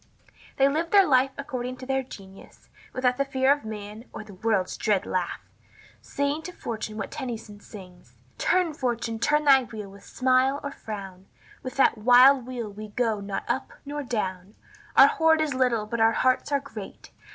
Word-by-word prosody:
They 270 - +5
lived 320 +4 -1
their 400 -2 +6
life 260 -1 +4
according 255 -3 -5
to 255 - -9
their 265 0 0
genius, 195 -6 -14 0.2
without 250 -1 0
the 275 - +2
fear 270 0 +3
of 290 - -7
man 215 +1 -8
or - - -7
of - - -12
"the 205 - -12
world's 195 -1 -1
dread 205 -3 0
laugh," 180 -2 -2 0.6
saying 285 +2 -2
to 360 - -7
Fortune 215 -8 -6
what 200 - -5
Tennyson 225 -4 -6
sings: 180 - -14 0.2
"Turn, 360 -4 +2
Fortune, 235 -4 -2
turn 300 +5 +2
thy 270 -2 +7
wheel 210 -3 -8
with 200 0 -15
smile 260 +2 +1
or 285 - -4
frown, 195 -6 -8 0.3
With 255 - -7
that 265 -4 +3
wild 250 +3 +6
wheel 245 -3 -5
we 215 +2 -8
go 220 0 -1
not 200 -1 -4
up 265 - -2
nor 290 +1 -4
down; 200 -6 -4 0.4
Our - - +10
hoard 320 0 +3
is 310 -3 0
little, 250 -4 +1
but 225 +2 -3
our 225 0 +5
hearts 255 +4 +1
are 285 - +2
great. 225 -8 -10
245 Hz, 185 wpm, -26 LUFS, 210-275 Hz, 0.6 s, Our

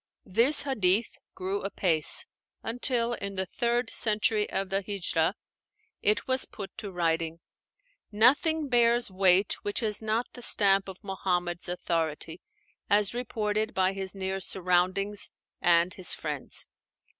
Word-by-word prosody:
This 235 +10 +5
"hadith" 220 -6 +1 0.2
grew 190 +2 -3
apace, 175 -5 0 0.4
until, 240 0 0
in 200 -3 -5
the 190 0 -1
third 240 +4 -1
century 215 -1 +1
of 195 -1 -2
the 195 +1 0
Híjrah, 185 -4 0 0.7
it 210 +1 +1
was 260 0 +1
put 200 -3 -9
to 200 - -7
writing. 165 -2 -1 0.7
Nothing 290 +8 +3
bears 240 -3 +3
weight 190 +1 +3
which 205 +4 -2
has 215 -2 0
not 220 +2 0
the 245 - -11
stamp 195 -4 +2
of 190 +3 -11
Muhammad's 180 -2 -2
authority, 165 -2 -3 0.5
as 205 +1 +3
reported 220 -2 -2
by 190 0 +2
his 195 0 -1
near 190 0 -3
surroundings 185 +2 +1 0.3
and 170 +1 +4
his 185 - +1
friends. 150 -3 -4
195 Hz, 130 wpm, -28 LUFS, 180-225 Hz, 0.7 s, This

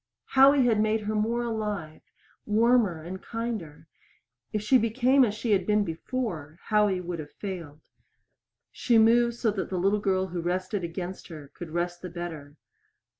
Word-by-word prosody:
Howie 270 0 +6
had 225 -3 +3
made 215 0 +1
her 210 +1 -3
more 225 +3 0
alive 210 -9 -4 0.5
warmer 215 -6 +3
and 185 +3 -7
kinder. 225 -11 -5 0.7
If 210 -1 -2
she 255 +4 +5
became 250 +4 +3
as 210 -4 0
she 225 +1 -2
had 190 -3 +2
been 210 0 +3
before 165 - -4
Howie 210 -3 +3
would 175 -1 -5
have 150 -1 -8
failed. 170 -7 -7 0.9
She 235 -2 +2
moved 235 +1 +4
so 230 -2 0
that 200 -2 -4
the 185 - -2
little 195 +4 +2
girl 190 -2 0
who 175 0 -4
rested 185 +3 -2
against 175 +2 -6
her 150 -5 -10
could 175 - -8
rest 175 +1 -3
the 180 - -6
better. 160 -4 -7
200 Hz, 165 wpm, -27 LUFS, 175-225 Hz, 0.9 s, Howie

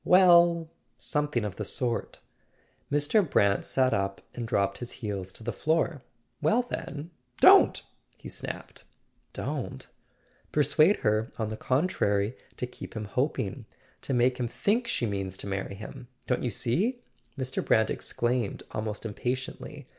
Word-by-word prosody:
"Well—something 170 - +3
of 100 -3 -5
the 105 - -2
sort." 120 +3 -2 0.7
Mr. 145 +9 +3
Brant 100 -4 +3
sat 130 -1 +2
up 100 0 -1
and 120 -2 -4
dropped 100 -3 0
his 120 - -6
heels 100 -5 -4
to - - -9
the 120 - -2
floor. 160 -2 0 0.4
"Well, 190 +12 +3
then— 160 -9 -6 0.3
don't!" - - +7 0.3
he - - -10
snapped. - - -6 0.5
"Don't - - -4 0.4
?" - - -36
"Persuade 155 +6 +4
her, 110 +3 +1
on 110 -2 -1
the - - -3
contrary, 110 - +1 0.2
to - - -1
keep 125 - -10
him 110 -1 -3
hoping 120 -1 -2 0.3
—to 135 - -3
make 125 +1 +3
him 120 - 0
think 225 - 0
she 130 - 0
means 95 -3 -3
to - - -6
marry 100 0 -3
him. 110 +4 -9 0.2
Don't 125 - 0
you 125 - 0
see?" 200 - 0 0.3
Mr. 130 -1 -2
Brant 110 0 +3
exclaimed, 120 -3 -1
almost 110 0 -4
impatiently. 125 +4 -4
125 Hz, 145 wpm, -28 LUFS, 105-150 Hz, 0.7 s, don't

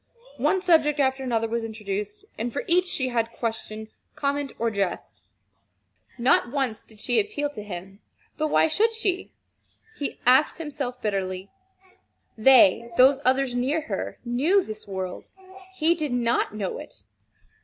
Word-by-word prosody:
One 380 -1 +1
subject 305 -4 +3
after 265 -1 +1
another 230 -3 0
was 230 +1 -2
introduced, 210 -2 -5
and 235 +2 -3
for 280 - -3
each 360 +1 +3
she 260 -7 -1
had 230 -1 -1
question, 220 -1 -4 0.3
comment, 285 -1 -1
or 230 0 0
jest. 195 -4 -3 0.9
Not 240 -1 +3
once 265 -6 -1
did 220 -2 -15
she 245 - +2
appeal 295 -9 -2
to 215 - -7
him. 195 0 -8 0.4
But 310 - 0
why - - +4
should 420 +9 +2
she, 390 -5 -1 0.6
he 285 - -4
asked 255 +4 +5
himself 280 -6 -4
bitterly. 190 -2 -2 0.8
They 235 -1 +6
those 265 +2 +6
others 260 0 +2
near 270 +6 0
her, 315 - -4
knew 295 +12 +2
this 215 -6 -8
world. 190 -2 -5 0.5
He 330 -1 +3
did 305 -6 -3
not 235 -3 0
know 200 -3 -3
it. 100 - -12
245 Hz, 145 wpm, -25 LUFS, 215-295 Hz, 0.9 s, They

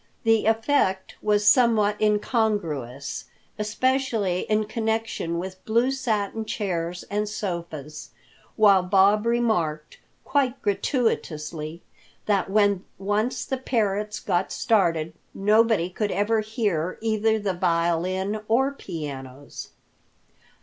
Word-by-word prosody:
The 225 -2 +3
effect 225 -4 +1
was 210 -1 +2
somewhat 210 -2 +4
incongruous, 205 - -1 0.3
especially 220 -4 0
in 215 0 +2
connection 220 -6 -2
with 185 +1 -6
blue 235 +4 +2
satin 225 -5 -1
chairs 180 -5 -3
and 210 +1 -1
sofas, 170 -7 -5 0.5
while 200 -3 +6
Bob 200 +4 +3
remarked, 175 -11 0 0.3
quite 270 -2 +1
gratuitously, 170 - -2 0.4
that 200 -3 +1
when 200 -2 +2
once 210 +5 -1
the 265 - -2
parrots 210 -4 -1
got 175 +2 -1
started 165 -8 +1 0.2
nobody 215 -2 +3
could 210 +3 -2
ever 215 +3 +1
hear 210 -6 -1
either 220 0 +1
the 205 -3 -1
violin 180 +4 0
or 265 +5 +2
pianos. 145 - -8
205 Hz, 100 wpm, -25 LUFS, 175-225 Hz, 0.5 s, while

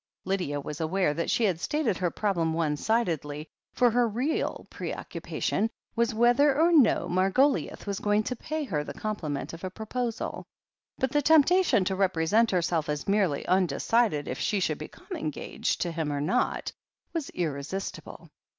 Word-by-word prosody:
" - - -55
Lydia 180 -7 -1
was 150 +2 -6
aware 165 -1 +1
that 170 +2 -2
she 235 - +2
had 185 -6 +2
stated 285 - 0
her 180 -2 0
problem 170 -5 0
one 160 -2 0
sidedly, 155 - -1 0.2
for 245 -2 +3
her 240 +1 +3
real 255 +9 -1
preoccupation 220 - -3 0.3
was 235 0 +2
whether 240 +6 +4
or - - +3
i68 - - -8
THE 300 - +2
HEEL 340 - +5
OF - - +1
ACHILLES 285 - +4
no 185 +1 +2 0.5
Margoliouth - - -15
was 200 -2 -3
going 210 +1 +2
to 250 - -3
pay 310 +5 -4
her 155 - -2
the - - -8
complimait 165 -11 -4
of 165 - -9
a 185 - -2
proposal. 225 +4 -4 0.5
But 265 -1 0
the 295 - +2
temptation 315 - +4
to 190 - 0
represent 190 +4 +2
herself 170 -4 0
as 150 0 -3
merely 195 -8 +1
undecided 185 0 +2
if - - -4
she 205 - 0
should 155 -5 -1
become 155 - -10
engaged 155 -2 -3
to 175 - 0
him 160 -2 -2
or 145 - -1
not, 160 - 0 0.4
was 325 -5 -3
irresistible. 165 +3 -4
195 Hz, 180 wpm, -28 LUFS, 160-235 Hz, 0.5 s, HEEL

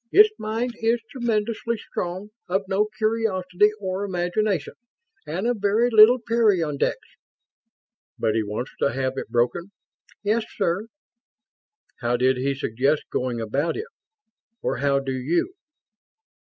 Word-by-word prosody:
Its 425 +2 +7
mind 225 +3 -2
is 230 +1 +2
tremendously 235 -1 -1
strong, 185 +1 -5 0.2
of 190 +2 -1
no 200 +2 +1
curiosity 210 -3 +2
or 190 0 -3
imagination, 185 -1 -1 0.5
and 175 +7 -3
of 240 -1 +1
very 215 +4 +2
little 220 +3 +8
peyondix." 205 -11 +1 1.2
"But 110 - +1
he 110 - +1
wants 105 +4 -4
to 140 - +1
have 130 0 -1
it - - -7
broken?" 125 +10 0 0.5
"Yes, 215 +2 +1
sir." 195 +2 0 1.1
"How 120 0 0
did 130 +1 +3
he 135 +2 0
suggest 135 +3 0
going 125 -2 -1
about 135 +8 -1
it? 425 - -4 0.8
Or - - 0
how 140 +1 +2
do 135 -1 -2
you?" 160 - 0
185 Hz, 130 wpm, -24 LUFS, 140-220 Hz, 1.2 s, little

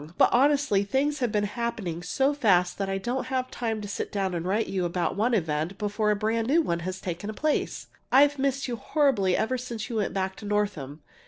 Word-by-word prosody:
but - - +6
honestly, 275 -6 +3
things 270 +7 0
have 245 -4 0
been 210 -1 +1
happening 205 -6 -3
so 265 - +1
fast 185 -11 +2
that 195 -1 -1
I 195 - -1
don't 245 +6 -3
have 255 -1 -2
time 225 -3 -2
to 205 - -6
sit 200 - -4
down 195 -3 -1
and 170 -1 -2
write 205 +5 0
you 190 -2 -2
about 175 0 -1
one 230 +4 +2
event 160 0 -1
before 210 +1 0
a 210 - +3
brand 220 +2 0
new 305 +6 +4
one 170 - -1
has 185 +2 -4
taken 180 +4 -4
place. 305 +4 -1 0.3
I've 285 +2 +5
missed 275 0 0
you 240 -2 -3
horribly 235 - +2
ever 255 +3 0
since 235 -4 -5
you 230 - -2
went 205 - -1
back 190 0 -1
to 210 - -9
Northam. 185 -9 -2
210 Hz, 220 wpm, -27 LUFS, 190-255 Hz, 0.3 s, but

